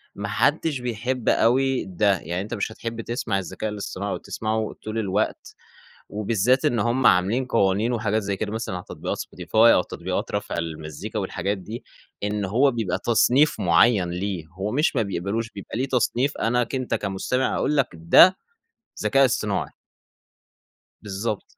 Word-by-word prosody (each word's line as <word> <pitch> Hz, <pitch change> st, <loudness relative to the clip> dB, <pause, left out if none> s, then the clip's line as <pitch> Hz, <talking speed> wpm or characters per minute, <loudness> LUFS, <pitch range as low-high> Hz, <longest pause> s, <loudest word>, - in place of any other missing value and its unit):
ما 100 Hz, 0 st, -4 dB
حدش 145 Hz, +5 st, +1 dB
بيحب 125 Hz, +1 st, -2 dB
أوي 130 Hz, +3 st, +2 dB
ده. 95 Hz, 0 st, +1 dB
يعني 85 Hz, +4 st, -4 dB
أنت 105 Hz, +4 st, -6 dB
مش 110 Hz, 0 st, -2 dB
هتحب 115 Hz, +1 st, -5 dB
تسمع 115 Hz, -4 st, -2 dB
الذكاء 95 Hz, +4 st, -4 dB
الإصطناعي 100 Hz, -1 st, -4 dB
أو -, -, -2 dB
تسمعه 110 Hz, 0 st, -3 dB
طول 110 Hz, +1 st, -4 dB
الوقت 105 Hz, 0 st, -2 dB, 0.5 s
وبالذات 110 Hz, +4 st, +1 dB
إن 120 Hz, -, +2 dB
هُم 120 Hz, +4 st, +1 dB
عاملين 100 Hz, +9 st, +3 dB
قوانين 105 Hz, +1 st, +1 dB
وحاجات 110 Hz, -2 st, 0 dB
زي 100 Hz, -1 st, -3 dB
كده 105 Hz, +1 st, -3 dB
مثلًا 110 Hz, -4 st, -3 dB
على 90 Hz, -, -6 dB
تطبيقات -, -, -4 dB
Spotify -, -, -8 dB
أو 115 Hz, -3 st, +7 dB
تطبيقات -, -, -4 dB
رَفع -, -, -3 dB
المزّيكا 80 Hz, +6 st, -5 dB
والحاجات 95 Hz, +1 st, -2 dB
دي، 105 Hz, +5 st, -8 dB, 0.4 s
إن 105 Hz, 0 st, -1 dB
هو 125 Hz, +9 st, +3 dB
بيبقى 110 Hz, -7 st, -2 dB
تصنيف 125 Hz, +5 st, +3 dB
معيّن 90 Hz, +2 st, +4 dB
ليه، 90 Hz, -1 st, -3 dB
هو 95 Hz, +5 st, -5 dB
مش 150 Hz, +4 st, +1 dB
ما 115 Hz, -, +2 dB
بيقبلوش، 100 Hz, +4 st, -2 dB
بيبقى 100 Hz, +2 st, -7 dB
ليه 130 Hz, +2 st, 0 dB
تصنيف 125 Hz, +2 st, 0 dB
أنا 120 Hz, +2 st, +1 dB
ك 115 Hz, -, -5 dB
أنت 130 Hz, -1 st, -2 dB
كمستمع 105 Hz, +6 st, -1 dB
اقول 150 Hz, -, 0 dB
لك 135 Hz, -3 st, +3 dB
ده 85 Hz, -, +6 dB, 0.7 s
ذكاء 135 Hz, +6 st, +4 dB
إصطناعي. 130 Hz, -, 0 dB, 1.3 s
بالضبط. 105 Hz, +1 st, -3 dB
110 Hz, 160 wpm, -24 LUFS, 95-120 Hz, 1.3 s, أو